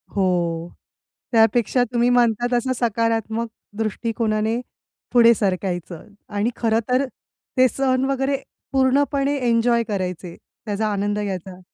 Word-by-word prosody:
हो, 175 -3 0 0.6
त्यापेक्षा 230 +2 +3
तुम्ही 240 +1 +3
म्हणता 240 -1 +3
तसं 255 +2 -1
सकारात्मक 230 0 0 0.3
दृष्टिकोनाने 220 0 -1 0.5
पुढे 235 -1 +7
सरकायचं 185 -5 -2 0.3
आणि 210 +4 +1
खरं 225 -1 +1
तर 255 +2 +2 0.5
ते 255 0 +6
सण 260 0 +1
वगैरे 270 +1 0 0.3
पूर्णपणे 275 +1 +2
एन्जॉय 235 0 +3
करायचे, 180 -3 -3 0.3
त्याचा 215 0 -1
आनंद 205 +1 -1
घ्यायचा. 190 -2 -5
225 Hz, 105 wpm, -22 LUFS, 200-245 Hz, 0.6 s, पुढे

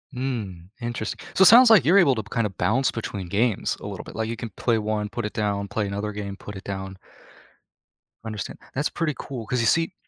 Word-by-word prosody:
Mm, 105 -10 -4
interest 120 -2 -4 0.2
so, - - 0
it - - +9
sounds 240 +4 +9
like 215 - +7
you're 180 +7 +6
able 140 -8 +5
to, 110 - -3
kind 115 +1 -1
of, 95 - -13
bounce 130 +5 +2
between 100 -5 -5
games 105 +3 0
a - - -8
little - - -7
bit, - - -11
like, 110 0 -2
you 115 - -4
can 115 - -5
play 115 -2 +1
one, 105 -1 -2
put 120 0 -4
it 105 - -4
down, 100 -1 -1
play 105 +2 -2
another 100 +2 -3
game, 100 -1 -5
put 105 - -9
it 95 - -8
down. 95 -1 -6 1.3
Understand. 110 -2 -5
That's 140 +3 0
pretty 160 -3 -1
cool, 125 -5 -6
'cause 125 +1 0
you - - +1
see, 165 - +2
110 Hz, 225 wpm, -24 LUFS, 100-125 Hz, 1.3 s, it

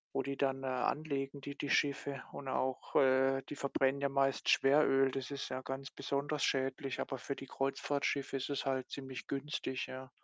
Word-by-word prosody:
wo 135 - +2
die 140 +1 -3
dann, 135 -1 0
äh, - - -3
anlegen, 135 +2 -1
die 140 +1 -6
die 145 - -3
Schiffe 140 -1 +1
und 140 - -7
auch, 130 0 -1
äh 135 0 +5
die 145 - -5
verbrennen 140 0 +1
ja 140 - +2
meist 135 -1 +1
Schweröl. 135 -1 +5
Das 135 +1 -4
ist 140 -1 -4
ja 130 0 -3
ganz 135 +2 -5
besonders 145 +1 -1
schädlich, 135 0 0
aber 135 - -2
für 140 - -3
die 135 - -8
Kreuzfahrtschiffe 140 +1 -1
ist 135 +1 -3
es 140 - -1
halt 130 -1 -1
ziemlich 135 -2 -6
günstig, 135 -2 -2
ja. 130 0 -7
135 Hz, 190 wpm, -35 LUFS, 135-140 Hz, -, äh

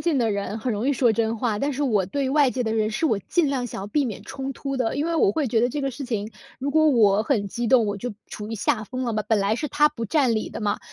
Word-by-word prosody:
近 335 -4 +1
的 230 -3 +2
人， 200 +2 -3
很 245 +2 -2
容 220 +6 -1
易 - - +3
说 240 -3 +3
真 225 +1 0
话。 220 -3 -1
但 285 +4 0
是 285 +2 -2
我 210 -9 +1
对 270 +5 -1
外 285 -2 +4
界 250 0 -2
的 220 - -1
人， 220 -1 +1
是 270 +9 -2
我 220 -10 +2
尽 325 - 0
量 260 -3 -1
想 195 - -6
要 - - -5
避 280 +5 0
免 215 - -6
冲 270 -1 -5
突 275 -1 -4
的。 245 +1 0
因 290 - 0
为 335 0 -1
我 200 - +4
会 285 +5 -1
觉 225 -1 +2
得 245 - +3
这 285 +3 -3
个 270 - 0
事 260 +2 -7
情， 220 -3 -3 0.3
如 280 +2 -2
果 310 +1 +4
我 215 -6 +4
很 215 -4 0
激 235 +4 -3
动， 240 -1 +5
我 205 -1 -2
就 235 0 -5
处 210 0 -7
于 225 - -4
下 215 +1 0
风 255 +3 -4
了， 235 - -1
本 215 0 +1
来 200 +2 +1
是 300 +4 -3
他 295 +2 +3
不 230 -6 -5
占 260 -3 +2
理 215 - -2
的 - - -7
嘛， 205 - 0
240 Hz, 330 characters per minute, -24 LUFS, 215-275 Hz, 0.3 s, 动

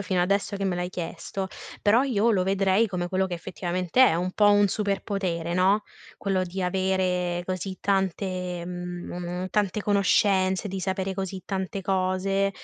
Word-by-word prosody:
fino 185 -2 +1
adesso 200 +2 0
che 195 - -3
me 190 -2 0
l'hai 180 0 -2
chiesto, 185 +2 -5 0.3
però 220 +4 +5
io 235 -4 +2
lo 195 -5 +2
vedrei 195 +3 +3
come 180 -2 -3
quello 190 +1 +1
che 180 - -4
effettivamente 180 +5 0
è: - - +3
un 180 +2 -1
po' 205 +1 +5
un 205 0 +5
superpotere, 195 -4 -2
no, 190 +4 +3 0.3
quello 190 -2 0
di 185 +1 -4
avere 180 -1 0
così 185 +1 -4
tante 185 -2 -1
mhmm, 180 0 -6
mo 175 - -6
mo 180 +1 -4
tante 210 +1 0
conoscenze, 195 -1 +2
di 195 -1 -4
sapere 190 0 -2
così 190 -1 -4
tante 195 0 -3
cose 190 +1 +1
190 Hz, 165 wpm, -26 LUFS, 180-195 Hz, 0.3 s, però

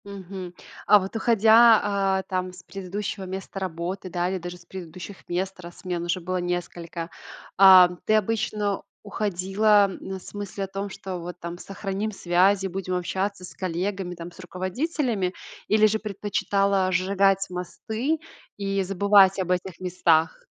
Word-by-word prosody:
Мгм. 190 -2 -8 0.3
А 210 - +8
вот 195 +3 -6
уходя, 225 0 +6
а, 195 -2 +1
там 185 -1 -3
с 180 - -13
предыдущего 195 +1 -5
места 190 +1 -6
работы, 185 +1 -4
да, 175 0 -1
или 190 0 -2
даже 175 +1 -7
с 175 - -19
предыдущих 185 +1 -9
мест, 190 +2 -2
раз 175 -1 -11
смен 180 -3 -3
уже 175 +1 -1
было 185 +2 -2
несколько, 175 -1 -4 0.5
ам, 185 -2 +8
ты 215 - +3
обычно 215 -1 0 0.2
уходила, 205 0 +2
на 190 0 -6
с - - -13
мыслью 200 -1 -4
о - - -10
том, 195 +1 -5
что 190 -1 -6
вот 175 +1 -8
там 170 +1 -6
сохраним 195 +3 -4
связи, 190 +1 +2
будем 185 0 -4
общаться 190 +2 -2
с 180 - -9
коллегами 185 +1 -3
там, 170 +1 -8
с 175 - -19
руководителями, 190 - -2 0.3
или 215 0 +5
же 215 +1 +1
предпочитала 200 -2 0
сжигать 195 +1 +2
мосты 220 - -3 0.4
и 195 -1 -1
забывать 195 0 +4
об 180 -1 -1
этих 180 -1 -2
местах? 180 - +1
190 Hz, 150 wpm, -25 LUFS, 180-200 Hz, 0.5 s, А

